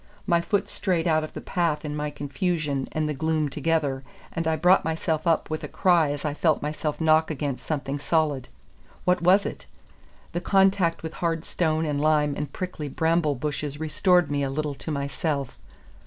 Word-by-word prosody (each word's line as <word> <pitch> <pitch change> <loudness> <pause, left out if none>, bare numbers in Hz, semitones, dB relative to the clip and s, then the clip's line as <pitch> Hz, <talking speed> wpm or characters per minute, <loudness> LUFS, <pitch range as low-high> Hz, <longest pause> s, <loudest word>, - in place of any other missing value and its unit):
My 170 -3 +3
foot 200 +3 0
strayed 180 -4 -1
out 155 -1 +3
of 155 - -7
the - - -6
path 170 -4 -1
in 150 0 -3
my 150 0 -2
confusion 145 -1 -2
and 155 -1 -1
the 150 - -1
gloom 155 0 0
together, 150 -2 0 0.3
and 165 0 -2
I 160 - +2
brought 180 +4 +4
myself 160 0 -1
up 165 -1 +2
with 155 - -3
a - - -3
cry 175 -5 +3
as 145 +1 -4
I 150 - 0
felt 155 +1 +2
myself 150 0 -3
knock 160 0 +4
against 140 -4 -3
something 145 -2 -2
solid. 145 -3 0 0.6
What 180 0 +3
was 185 +4 +5
it? - - -6 0.6
The 175 - -2
contact 190 -4 +3
with 160 - -5
hard 165 -1 0
stone 160 -2 0
and 145 -2 -1
lime 150 -1 +3
and 145 -1 -4
prickly 180 -4 -5
bramble 160 0 +1
bushes 145 +1 -4
restored 175 +2 +2
me 145 -1 0
a 135 - 0
little 150 +1 -2
to 140 - -8
myself. 140 -1 -2
155 Hz, 185 wpm, -25 LUFS, 145-165 Hz, 0.6 s, was